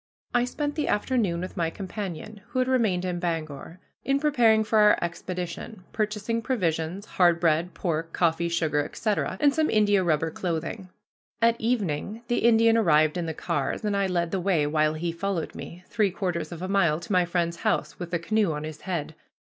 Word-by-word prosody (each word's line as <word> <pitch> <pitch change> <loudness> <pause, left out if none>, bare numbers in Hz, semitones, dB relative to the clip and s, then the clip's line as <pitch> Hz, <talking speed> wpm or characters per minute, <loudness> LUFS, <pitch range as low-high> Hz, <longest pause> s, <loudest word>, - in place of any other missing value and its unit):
I 245 - +3
spent 290 +3 -3
the 300 - -2
afternoon 205 -6 0
with 185 - -6
my 165 -2 0
companion, 200 +2 -6
who - - -6
had 255 0 +2
remained 220 -9 +1
in 180 -1 -2
Bangor, 165 -1 -4 0.2
in 275 0 +1
preparing 240 -7 +4
for 215 0 +2
our 210 0 +6
expedition, 180 +4 -5
purchasing 215 +1 -1
provisions, 180 - -1
hard 175 -4 +3
bread, 165 +1 +1
pork, 165 -2 -2
coffee, 170 0 +1
sugar, 160 -3 +1
etc., 210 -1 -2
and 285 -1 +4
some 315 0 +1
india 205 -3 +3
rubber 160 -1 +1
clothing. 180 +3 -4 0.5
At 230 0 +2
evening 220 -2 -1
the 240 - +2
Indian 230 0 +5
arrived 155 -6 +4
in 175 -2 -2
the 160 - -4
cars, 150 +10 -2
and 205 -1 0
I 200 -1 +1
led 170 -2 -1
the 195 - 0
way, 175 -5 +2
while 155 +1 +1
he 170 +2 -2
followed 170 -1 -3
me, 175 +2 -9
three 210 -3 +1
quarters 180 -2 -3
of 170 +1 -7
a - - -2
mile 170 -6 +2
to 210 - -9
my 180 -2 +4
friend's 170 -1 -1
house, 150 -4 -1
with 175 -1 -5
the 170 - 0
canoe 200 +1 +1
on 150 0 -4
his 155 -1 -7
head. 170 -6 -3
180 Hz, 190 wpm, -26 LUFS, 165-215 Hz, 0.5 s, our